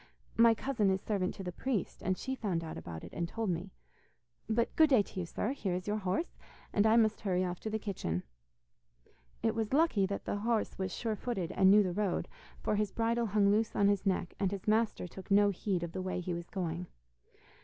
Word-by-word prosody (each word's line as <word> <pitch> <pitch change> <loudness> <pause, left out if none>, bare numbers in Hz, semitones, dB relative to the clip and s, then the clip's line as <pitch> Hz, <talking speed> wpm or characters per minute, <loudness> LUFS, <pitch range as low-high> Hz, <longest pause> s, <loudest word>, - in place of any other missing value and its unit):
My 230 0 +6
cousin 225 -4 +1
is 190 0 +2
servant 190 -2 -1
to 195 - -7
the 180 - -4
priest, 230 +1 -2
and 185 0 0
she 265 - -3
found 195 -10 -2
out 160 - -6
about 80 -2 -7
it - - -10
and 170 0 -2
told 225 -2 -1
me. 175 +3 -4 0.8
But 230 +1 +1
good 315 -1 +6
day 250 -7 +5
to 190 - -8
you, 175 - -3
sir; 215 - -2
here 200 -10 -2
is 180 - -4
your 210 +1 0
horse, 195 - -2 0.3
and 205 +1 +4
I 220 - +5
must 220 -2 +3
hurry 185 -3 +1
off 180 0 -4
to 220 - -4
the 220 - -1
kitchen.' 170 - -3 1.2
It - - +2
was 225 +1 -2
lucky 280 -11 +3
that 200 - -4
the - - -1
horse 220 0 -1
was 190 -1 -1
sure 225 +1 -2
footed 195 -6 -3
and 190 - +5
knew 205 +1 +7
the 180 -2 -1
road, 200 -1 0 0.4
for 210 - +1
his 210 -2 0
bridle 230 0 +1
hung 200 -1 +3
loose 215 +1 +1
on 200 0 +4
his 200 -2 +1
neck, 185 -2 0
and 195 -2 +2
his 195 0 -6
master 215 -3 +2
took 185 +2 -11
no 205 0 +5
heed 185 -2 -1
of 170 - -4
the 185 - -4
way 185 0 -2
he 180 0 -3
was 170 0 -6
going. 175 -3 -3
200 Hz, 230 wpm, -32 LUFS, 185-220 Hz, 1.2 s, knew